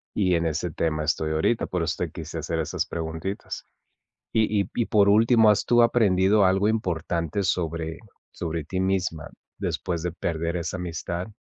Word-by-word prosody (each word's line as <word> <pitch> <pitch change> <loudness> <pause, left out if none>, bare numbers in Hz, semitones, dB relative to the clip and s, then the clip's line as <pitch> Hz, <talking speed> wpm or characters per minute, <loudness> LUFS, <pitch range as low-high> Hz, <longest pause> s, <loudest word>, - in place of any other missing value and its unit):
Y 95 -3 +2
en 85 0 0
ese 80 +2 -2
tema 75 -1 -1
estoy 80 0 0
ahorita, 80 +9 +1
por 90 -2 -1
eso 80 - -1
te - - -4
quise 80 0 -6
hacer 80 +1 -2
esas 80 - -1
preguntitas. 80 +4 -5 0.7
Y 110 -2 +2
y 95 - -11
y 120 - +1
por 100 -2 +4
último, 110 +1 +5
¿has 105 -1 +3
tú 120 0 +5
aprendido 105 -4 +4
algo 95 +2 +3
importante 90 -4 -1
sobre 85 -2 -1 0.3
sobre 85 -2 -4
ti 95 +5 -4
misma, 95 -4 -1 0.3
después 85 -3 -2
de 90 - -1
perder 85 0 -2
esa 85 +2 -3
amistad? 85 0 -4
90 Hz, 170 wpm, -25 LUFS, 80-100 Hz, 0.7 s, último